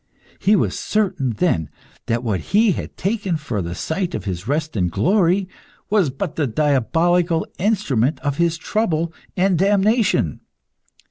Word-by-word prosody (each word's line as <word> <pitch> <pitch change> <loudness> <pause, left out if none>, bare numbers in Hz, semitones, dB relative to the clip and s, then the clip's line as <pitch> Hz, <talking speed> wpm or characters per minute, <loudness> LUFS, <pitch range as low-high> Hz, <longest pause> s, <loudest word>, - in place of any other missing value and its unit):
He 205 +3 +4
was - - 0
certain 185 - 0
then 95 - 0 0.4
that 115 +1 0
what 105 -6 0
he 210 - +3
had - - -5
taken 195 -3 -1
for 135 -9 -3
the 85 0 -4
site 175 - -2
of - - -5
his 95 0 -4
rest 150 +1 -1
and 90 -4 +1
glory, 185 - +2 0.4
was 200 -8 +3
but 145 +5 -5
the 150 -3 +1
diabolical 160 - +1
instrument 150 - +1
of 145 0 -2
his 170 -1 +1
trouble 165 -4 -1 0.2
and 185 -2 +2
damnation. 200 - +2
165 Hz, 145 wpm, -21 LUFS, 130-195 Hz, 0.4 s, He